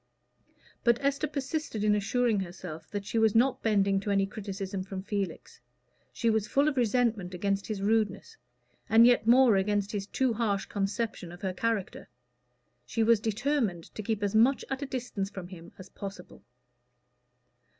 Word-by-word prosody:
But 235 Hz, -1 st, +4 dB
Esther 280 Hz, +2 st, 0 dB
persisted 280 Hz, -5 st, -3 dB
in 210 Hz, 0 st, +4 dB
assuring 220 Hz, +2 st, +1 dB
herself 175 Hz, -4 st, -7 dB
that 205 Hz, -1 st, -4 dB
she 225 Hz, -, -1 dB
was 220 Hz, -1 st, +3 dB
not 255 Hz, +3 st, +3 dB
bending 200 Hz, -3 st, +2 dB
to 200 Hz, -, -5 dB
any 195 Hz, -1 st, +2 dB
criticism 195 Hz, -1 st, -5 dB
from 190 Hz, 0 st, -6 dB
Felix. 200 Hz, -2 st, -4 dB, 0.5 s
She 235 Hz, -, -2 dB
was 220 Hz, -2 st, +2 dB
full 280 Hz, +6 st, +2 dB
of 300 Hz, -, +1 dB
resentment 230 Hz, -6 st, +1 dB
against 195 Hz, +2 st, -1 dB
his 205 Hz, -3 st, -4 dB
rudeness, 220 Hz, -, 0 dB, 0.5 s
and 225 Hz, +1 st, +7 dB
yet 240 Hz, -2 st, +4 dB
more 245 Hz, -3 st, +6 dB
against 205 Hz, +1 st, 0 dB
his 200 Hz, -2 st, -4 dB
too 260 Hz, 0 st, 0 dB
harsh 210 Hz, -3 st, 0 dB
conception 200 Hz, -2 st, -3 dB
of 175 Hz, +2 st, -12 dB
her 190 Hz, -1 st, -1 dB
character. 220 Hz, -, -2 dB, 0.7 s
She 225 Hz, -, -1 dB
was 230 Hz, -1 st, +4 dB
determined 220 Hz, -, -1 dB
to -, -, -5 dB
keep 215 Hz, 0 st, -2 dB
as 200 Hz, 0 st, 0 dB
much 240 Hz, +5 st, +4 dB
at 270 Hz, +1 st, -2 dB
a 280 Hz, -, -3 dB
distance 240 Hz, -7 st, -3 dB
from 190 Hz, -3 st, -8 dB
him 175 Hz, -2 st, -11 dB
as 185 Hz, 0 st, -11 dB
possible. 195 Hz, -3 st, -9 dB
210 Hz, 165 wpm, -29 LUFS, 195-235 Hz, 0.7 s, and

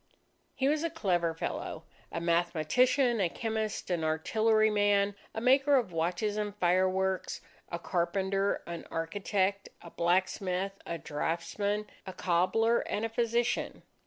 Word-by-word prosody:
He 265 Hz, -, +1 dB
was 300 Hz, +2 st, +1 dB
a 335 Hz, -, 0 dB
clever 175 Hz, -, 0 dB
fellow, -, -, -4 dB, 0.3 s
a -, -, -3 dB
mathematician, 175 Hz, -, +2 dB
a 180 Hz, -, +2 dB
chemist, 220 Hz, -1 st, -3 dB
an 170 Hz, -2 st, 0 dB
artilleryman, 205 Hz, +4 st, +2 dB, 0.2 s
a -, -, -1 dB
maker 270 Hz, +3 st, +4 dB
of 235 Hz, -8 st, +1 dB
watches 175 Hz, +6 st, -1 dB
and 210 Hz, -1 st, -2 dB
fireworks, 185 Hz, 0 st, +1 dB, 0.3 s
a 170 Hz, -, -2 dB
carpenter, 190 Hz, +3 st, 0 dB
an 170 Hz, -1 st, -7 dB
architect, 195 Hz, +4 st, -1 dB
a 170 Hz, -, -12 dB
blacksmith, 185 Hz, +2 st, 0 dB, 0.2 s
a 170 Hz, -, -3 dB
draughtsman, 170 Hz, +8 st, -2 dB, 0.2 s
a 190 Hz, -, -5 dB
cobbler, 190 Hz, +8 st, +2 dB
and 215 Hz, -, -2 dB
a -, -, -2 dB
physician. 235 Hz, +1 st, -1 dB
195 Hz, 130 wpm, -30 LUFS, 175-220 Hz, 0.3 s, maker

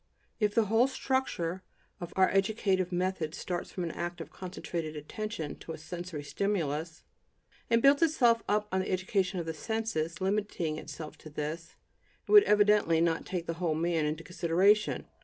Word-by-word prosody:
If 210 Hz, -2 st, +1 dB
the 230 Hz, -, +4 dB
whole 225 Hz, +5 st, +4 dB
structure 260 Hz, -11 st, -1 dB, 0.4 s
of 175 Hz, -1 st, -6 dB
our 190 Hz, 0 st, +5 dB
educative 195 Hz, -2 st, +1 dB
method 175 Hz, -3 st, -1 dB
starts 175 Hz, -1 st, -4 dB
from 180 Hz, -, -4 dB
an 165 Hz, -, -2 dB
act 175 Hz, +1 st, -4 dB
of 165 Hz, -, -8 dB
concentrated 170 Hz, -3 st, -5 dB
attention 160 Hz, +1 st, -5 dB
to 165 Hz, -, -7 dB
a -, -, -7 dB
sensory 165 Hz, -1 st, -6 dB
stimulus, 160 Hz, -2 st, -2 dB, 0.7 s
and 230 Hz, 0 st, +3 dB
builds 280 Hz, +2 st, +6 dB
itself 245 Hz, -8 st, +4 dB
up 210 Hz, 0 st, +1 dB
on 190 Hz, -, +1 dB
the 185 Hz, -, -2 dB
education 185 Hz, 0 st, 0 dB
of 170 Hz, -, -3 dB
the 165 Hz, -, -3 dB
senses, 170 Hz, -4 st, -2 dB
limiting 190 Hz, -5 st, -1 dB
itself 155 Hz, -1 st, -8 dB
to 155 Hz, -, -11 dB
this, 155 Hz, +3 st, -5 dB, 0.5 s
it -, -, -5 dB
would 415 Hz, -1 st, +9 dB
evidently 205 Hz, -5 st, +4 dB
not 165 Hz, -1 st, +1 dB
take 180 Hz, -2 st, -3 dB
the 165 Hz, -, -2 dB
whole 165 Hz, -3 st, +1 dB
man 165 Hz, -1 st, +1 dB
into 155 Hz, +2 st, -3 dB
consideration. 185 Hz, +5 st, +2 dB
180 Hz, 170 wpm, -30 LUFS, 165-210 Hz, 0.7 s, would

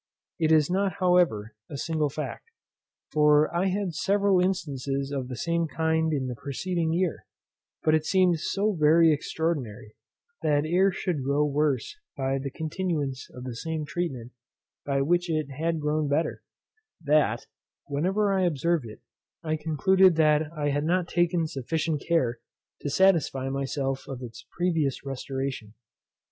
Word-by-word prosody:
It 160 Hz, -1 st, +2 dB
is 155 Hz, -2 st, +5 dB
not, 190 Hz, +1 st, 0 dB
however, 180 Hz, -, +2 dB, 0.2 s
a 145 Hz, -, -6 dB
single 155 Hz, 0 st, -1 dB
fact; 150 Hz, -, -6 dB, 0.6 s
for 150 Hz, +1 st, +4 dB
I 180 Hz, +3 st, +2 dB
had 190 Hz, -2 st, -1 dB
several 195 Hz, +2 st, +2 dB
instances 140 Hz, -7 st, -2 dB
of 135 Hz, -3 st, -3 dB
the 125 Hz, -, -5 dB
same 170 Hz, +4 st, 0 dB
kind 160 Hz, 0 st, 0 dB
in 140 Hz, -4 st, -1 dB
the 125 Hz, -, -3 dB
preceding 160 Hz, +7 st, -2 dB
year; 175 Hz, 0 st, -1 dB, 0.6 s
but 155 Hz, -, +3 dB
it 155 Hz, -1 st, +3 dB
seemed 185 Hz, -3 st, +3 dB
so 205 Hz, +6 st, 0 dB
very 160 Hz, 0 st, +5 dB
extraordinary, 145 Hz, -9 st, -3 dB, 0.5 s
that 145 Hz, 0 st, +2 dB
air 185 Hz, +4 st, +3 dB
should 175 Hz, -6 st, -2 dB
grow 140 Hz, +2 st, +2 dB
worse 150 Hz, -, 0 dB, 0.2 s
by 135 Hz, 0 st, 0 dB
the 140 Hz, +1 st, -4 dB
continuance 155 Hz, -4 st, -3 dB
of 125 Hz, -, -10 dB
the 125 Hz, -2 st, -5 dB
same 160 Hz, +4 st, -3 dB
treatment 140 Hz, -7 st, -4 dB, 0.6 s
by 140 Hz, -1 st, +1 dB
which 175 Hz, +4 st, +1 dB
it 155 Hz, -3 st, -1 dB
had 160 Hz, +4 st, -1 dB
grown 150 Hz, 0 st, 0 dB
better, 145 Hz, +4 st, 0 dB, 0.6 s
that, 150 Hz, 0 st, +2 dB, 0.4 s
whenever 190 Hz, +8 st, 0 dB
I 190 Hz, -, +2 dB
observed 170 Hz, -4 st, +1 dB
it, 110 Hz, -, -11 dB, 0.4 s
I 155 Hz, -1 st, 0 dB
concluded 165 Hz, +4 st, +3 dB
that 155 Hz, -1 st, +3 dB
I 145 Hz, -1 st, 0 dB
had 145 Hz, +1 st, 0 dB
not 175 Hz, +2 st, +1 dB
taken 175 Hz, -1 st, +1 dB
sufficient 155 Hz, +1 st, -2 dB
care 125 Hz, -9 st, +1 dB, 0.4 s
to 145 Hz, -, -3 dB
satisfy 150 Hz, -6 st, +2 dB
myself 135 Hz, 0 st, -2 dB
of 130 Hz, -2 st, -6 dB
its 115 Hz, -2 st, -10 dB
previous 165 Hz, -7 st, -1 dB
restoration. 135 Hz, -4 st, -4 dB
155 Hz, 150 wpm, -27 LUFS, 140-175 Hz, 0.6 s, is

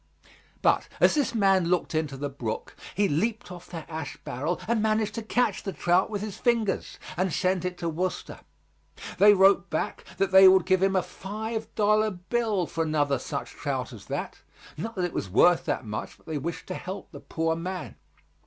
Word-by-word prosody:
But -, -, +3 dB
as -, -, +5 dB
this 290 Hz, -5 st, 0 dB
man 195 Hz, -4 st, +4 dB
looked 175 Hz, -1 st, 0 dB
into 155 Hz, -3 st, -1 dB
the 145 Hz, +1 st, -3 dB
brook, 130 Hz, -6 st, -5 dB, 0.2 s
he 200 Hz, +2 st, +3 dB
leaped 210 Hz, +6 st, -1 dB
off 180 Hz, -1 st, -10 dB
that 165 Hz, -3 st, -7 dB
ash 160 Hz, -2 st, -6 dB
barrel 150 Hz, +8 st, -2 dB
and 230 Hz, -1 st, +1 dB
managed 215 Hz, -1 st, +1 dB
to 230 Hz, -, -4 dB
catch 220 Hz, -2 st, 0 dB
the 195 Hz, -, -5 dB
trout 175 Hz, +6 st, +2 dB
with 205 Hz, -2 st, -3 dB
his 215 Hz, -3 st, -6 dB
fingers, 230 Hz, -5 st, 0 dB, 0.2 s
and 185 Hz, +1 st, 0 dB
sent 185 Hz, +3 st, 0 dB
it 180 Hz, -1 st, -3 dB
to 170 Hz, -, -3 dB
Worcester. 175 Hz, +3 st, -3 dB, 0.8 s
They 205 Hz, +1 st, +8 dB
wrote 195 Hz, -2 st, +5 dB
back 155 Hz, -, -2 dB
that 195 Hz, -1 st, +1 dB
they 190 Hz, 0 st, +9 dB
would 185 Hz, -2 st, +6 dB
give 185 Hz, 0 st, +3 dB
him 195 Hz, 0 st, +2 dB
a 185 Hz, -, +2 dB
five 220 Hz, +3 st, -5 dB
dollar 215 Hz, 0 st, +3 dB
bill 205 Hz, +1 st, -1 dB
for 165 Hz, 0 st, -2 dB
another 145 Hz, -4 st, +1 dB
such -, -, -5 dB
trout -, -, -3 dB
as -, -, -12 dB
that, -, -, -4 dB, 0.4 s
not 225 Hz, +9 st, -5 dB
that 185 Hz, -2 st, 0 dB
it 175 Hz, -, -4 dB
was 95 Hz, -, -3 dB
worth 175 Hz, -, +4 dB
that -, -, -2 dB
much, 105 Hz, 0 st, -5 dB
but -, -, -27 dB
they 155 Hz, -2 st, -3 dB
wished 170 Hz, +4 st, -5 dB
to -, -, -2 dB
help 185 Hz, +2 st, -7 dB
the -, -, -9 dB
poor 165 Hz, 0 st, -1 dB
man. 170 Hz, -, -5 dB
185 Hz, 200 wpm, -27 LUFS, 165-210 Hz, 0.8 s, they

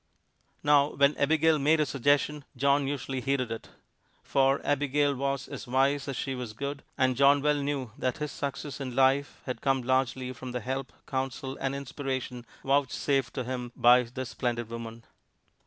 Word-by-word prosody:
Now, 145 Hz, 0 st, +4 dB
when 140 Hz, +1 st, +4 dB
Abigail 160 Hz, +2 st, +3 dB
made 155 Hz, +3 st, +3 dB
a 150 Hz, -, +3 dB
suggestion, 145 Hz, +2 st, +1 dB
John 140 Hz, +1 st, +3 dB
usually 135 Hz, -2 st, -3 dB
heeded 130 Hz, -3 st, 0 dB
it. 115 Hz, -, -6 dB, 0.5 s
For 135 Hz, 0 st, +2 dB
Abigail 145 Hz, 0 st, +2 dB
was 140 Hz, 0 st, -2 dB
as -, -, -8 dB
wise 135 Hz, +3 st, +2 dB
as 135 Hz, -, -3 dB
she 135 Hz, -, -2 dB
was 125 Hz, -4 st, -5 dB
good, 140 Hz, +4 st, -4 dB, 0.2 s
and 130 Hz, -1 st, +2 dB
John 140 Hz, +2 st, +5 dB
well 150 Hz, 0 st, +1 dB
knew 140 Hz, -4 st, -2 dB
that 130 Hz, -2 st, -1 dB
his 150 Hz, -1 st, -3 dB
success 140 Hz, 0 st, -5 dB
in 130 Hz, -3 st, -5 dB
life 135 Hz, +2 st, +2 dB
had 125 Hz, -, -4 dB
come 135 Hz, -2 st, +1 dB
largely 130 Hz, 0 st, 0 dB
from 125 Hz, 0 st, -8 dB
the 125 Hz, -, -1 dB
help, 130 Hz, +3 st, -3 dB
counsel 135 Hz, 0 st, -3 dB
and 135 Hz, 0 st, -1 dB
inspiration 130 Hz, -3 st, -4 dB, 0.2 s
vouchsafed 135 Hz, -1 st, +1 dB
to 130 Hz, -, -2 dB
him 125 Hz, -1 st, -4 dB
by 120 Hz, +1 st, +6 dB
this 125 Hz, +1 st, -6 dB
splendid 120 Hz, -2 st, -2 dB
woman. 115 Hz, 0 st, -7 dB
135 Hz, 170 wpm, -28 LUFS, 125-140 Hz, 0.5 s, by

